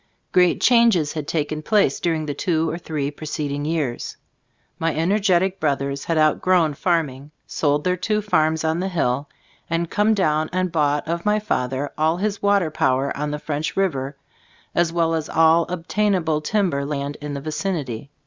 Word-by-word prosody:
Great 180 -1 +4
changes 230 -11 +4
had 155 -3 -5
taken 155 -1 -2
place 200 -5 +2
during 160 -2 -1
the 145 - -3
two 160 +2 0
or 165 - -3
three 150 -4 -3
preceding 145 -1 -4
years. 150 -6 -2 0.6
My 165 0 0
energetic 190 +2 +2
brothers 140 -2 -1
had 165 - 0
outgrown 155 +1 +3
farming, 145 -4 -1 0.2
sold 145 -1 0
their 180 0 +1
two 210 +3 -1
farms 160 -5 +1
on 160 +1 0
the 190 - -1
hill, 140 -6 -1 0.4
and 165 0 -1
come 215 +1 +3
down 155 -5 +1
and 185 0 -1
bought 150 -3 +1
of 170 +1 -2
my 210 0 +2
father 135 -9 -2
all 160 +2 +2
his 205 +1 -2
water 200 -5 +2
power 135 -1 +1
on 150 +1 -2
the 150 - -3
French 150 +2 -3
River, 140 -8 -1 0.6
as 170 -1 +2
well 165 -1 +1
as 160 -1 -2
all 165 +1 +4
obtainable 180 -2 0
timber 175 -5 0
land 140 0 -3
in 145 -1 -5
the 140 - -5
vicinity. 150 - -3
160 Hz, 165 wpm, -22 LUFS, 145-180 Hz, 0.6 s, Great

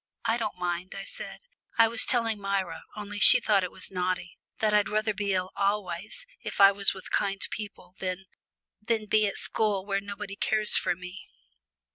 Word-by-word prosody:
"I 225 - +2
don't 215 -5 -4
mind," 180 +1 -3
I 195 - -5
said. - - -7 0.4
"I 230 0 +6
was 225 0 -1
telling 230 -3 +1
Myra, 195 -2 -3
only 205 -1 -6
she - - +10
thought 200 -3 +2
it 180 - -2
was - - -8
naughty, 180 -1 -3 0.2
that 215 -1 +1
I'd 210 -1 +3
rather 215 0 0
be 200 0 -2
ill 185 0 -1
always 200 - -2 0.2
if - - -6
I 195 0 +9
was 200 0 +4
with 190 - -11
kind 195 -1 0
people, 200 -4 -8
than 185 0 -4 0.6
than 220 0 -1
be 215 0 +2
at 200 - -4
school 205 -3 0
where 200 -1 -1
nobody 200 0 -7
cares 215 +1 +2
for - - +2
me." 180 +3 -10
200 Hz, 185 wpm, -27 LUFS, 185-215 Hz, 0.6 s, she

